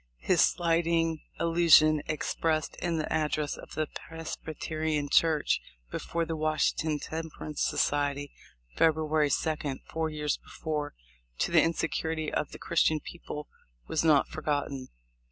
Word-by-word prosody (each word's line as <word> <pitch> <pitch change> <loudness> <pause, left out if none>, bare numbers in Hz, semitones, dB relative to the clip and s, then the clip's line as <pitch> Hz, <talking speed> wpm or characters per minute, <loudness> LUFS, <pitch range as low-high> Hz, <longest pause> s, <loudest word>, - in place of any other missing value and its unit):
His - - +2
slighting 165 -1 +2 0.2
allusion 165 -2 +5
expressed 155 +1 -1
in 170 -2 -1
the 155 - -2
address 155 -1 0
at - - -12
the 155 - 0 0.2
Presbyterian 155 -2 -3
Church 155 -1 +3 0.3
before 170 0 -2
the 165 0 -3
Washington 155 0 +1
Temperance 155 0 -5
Society, 145 -1 0 0.4
Feb 160 -2 +4
ruary 155 -1 +1
2d, 150 -1 -1
four 160 0 -2
years 150 -1 -1
before, 150 -2 -4 0.4
to - - 0
the - - +6
insincerity 160 -1 -1
of 150 - -1
the - - -8
Christian 160 -2 +2
people 150 -2 -8 0.4
was 160 - 0
not 155 -4 +5
forgotten. 145 -3 -2
155 Hz, 125 wpm, -29 LUFS, 150-160 Hz, 0.4 s, the